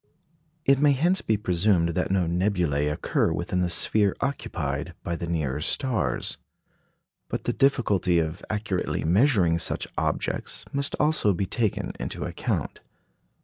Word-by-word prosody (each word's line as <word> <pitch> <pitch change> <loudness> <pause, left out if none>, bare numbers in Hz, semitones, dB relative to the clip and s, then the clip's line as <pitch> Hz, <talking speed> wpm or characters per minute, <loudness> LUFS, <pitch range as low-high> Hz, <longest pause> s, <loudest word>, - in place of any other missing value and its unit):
It 135 0 +4
may 145 0 +5
hence 175 +8 +2
be 110 - +1
presumed 90 -2 +2
that 90 +2 -1
no 95 -2 +2
nebulæ 85 -5 0
occur 75 - 0
within 90 - -2
the 90 -1 +1
sphere 100 +3 +3
occupied 140 0 -3
by 85 - -2
the 85 0 -5
nearer 75 -4 -2
stars. 110 - 0 0.9
But - - -4
the - - -1
difficulty 105 -10 +2
of 80 +3 -2
accurately 105 -4 -2
measuring 90 - +3
such - - -1
objects - - -2
must 140 0 +1
also 150 -9 +3
be 100 - -1
taken 110 +2 -1
into - - -4
account. - - -3
95 Hz, 140 wpm, -26 LUFS, 85-120 Hz, 0.9 s, may